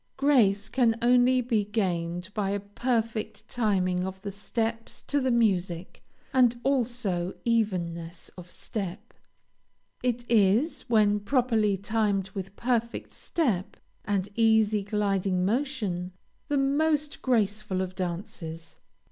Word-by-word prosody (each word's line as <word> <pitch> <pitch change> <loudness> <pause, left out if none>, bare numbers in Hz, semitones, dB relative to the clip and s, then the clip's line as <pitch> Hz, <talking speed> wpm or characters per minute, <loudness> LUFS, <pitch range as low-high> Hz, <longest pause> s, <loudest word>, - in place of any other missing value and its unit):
Grace 225 -8 +3
can 230 -1 +2
only 250 +1 +4
be 230 -4 +1
gained 180 -3 -2
by 200 -2 -1
a 200 +1 0
perfect 220 +1 -2
timing 185 -6 +1
of 190 0 -5
the 200 - -4
steps 225 +3 -3
to 285 - 0
the 260 - +1
music, 190 -7 0 0.3
and 245 -2 +4
also 235 -9 0
evenness 175 -7 -1
of 180 -1 -12
step. 205 +3 -6 0.9
It 245 -1 -1
is, 230 - +2
when 210 -2 +4
properly 220 -3 +2
timed 205 -2 0
with 195 0 -6
perfect 235 -1 -1
step, 225 - -1 0.3
and 200 -2 -1
easy, 220 -2 +3
gliding 195 -3 0
motion, 210 -7 -1 0.3
the 290 -2 +1
most 295 +2 +1
graceful 210 -5 0
of 185 -1 -2
dances. 170 -3 -6
210 Hz, 115 wpm, -27 LUFS, 190-240 Hz, 0.9 s, only